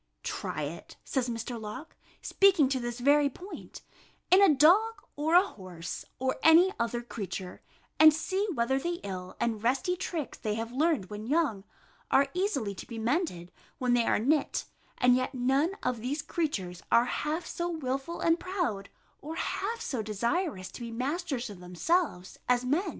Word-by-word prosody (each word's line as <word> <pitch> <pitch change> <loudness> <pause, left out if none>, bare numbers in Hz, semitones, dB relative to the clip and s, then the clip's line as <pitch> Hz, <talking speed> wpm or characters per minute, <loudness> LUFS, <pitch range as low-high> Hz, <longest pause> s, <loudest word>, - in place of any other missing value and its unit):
"Try 155 - -3
it," 155 +4 -7
says 255 -3 -1
Mr. 230 0 -4
Locke, 255 +9 -8 0.3
speaking 380 -8 +4
to 265 -1 0
this 240 0 -4
very 285 +3 +4
point, 365 +9 -10 0.5
"in 375 +2 +8
a 390 -5 +7
dog, 370 +11 +5 0.2
or 310 +3 +1
a 365 +2 +7
horse, 180 - -7
or 260 0 -1
any 340 +4 +6
other 235 +1 -1
creature, 190 -5 -6 0.4
and 315 0 +10
see 380 +6 -1
whether 250 +3 +1
the 345 +4 -3
ill 185 -2 -6
and 225 -3 -1
resty 265 +10 +1
tricks 330 -6 -4
they 210 -1 -2
have 225 +1 -4
learned 275 - +1
when 210 +1 -6
young, 275 -10 +1 0.4
are 275 +1 +4
easily 315 - -1
to - - -9
be 230 - -7
mended, 225 - -1 0.3
when 250 -1 +1
they 240 -1 +3
are - - +3
knit; 280 +7 +1 0.3
and 250 -1 +5
yet 255 +1 -1
none 270 +9 +1
of 250 -3 -1
these 285 +5 -2
creatures 195 - -3
are 235 - +6
half 305 +6 -2
so 345 0 -3
wilful 275 0 -3
and 330 0 +3
proud, 340 - -2 0.3
or 315 +3 -6
half 450 +7 -2
so 255 -6 -2
desirous 215 - -2
to - - -10
be 235 - -5
masters 265 +2 -2
of 195 - -11
themselves, 180 - -1
as 250 0 +3
men." 335 +9 +1
260 Hz, 170 wpm, -29 LUFS, 225-330 Hz, 0.5 s, and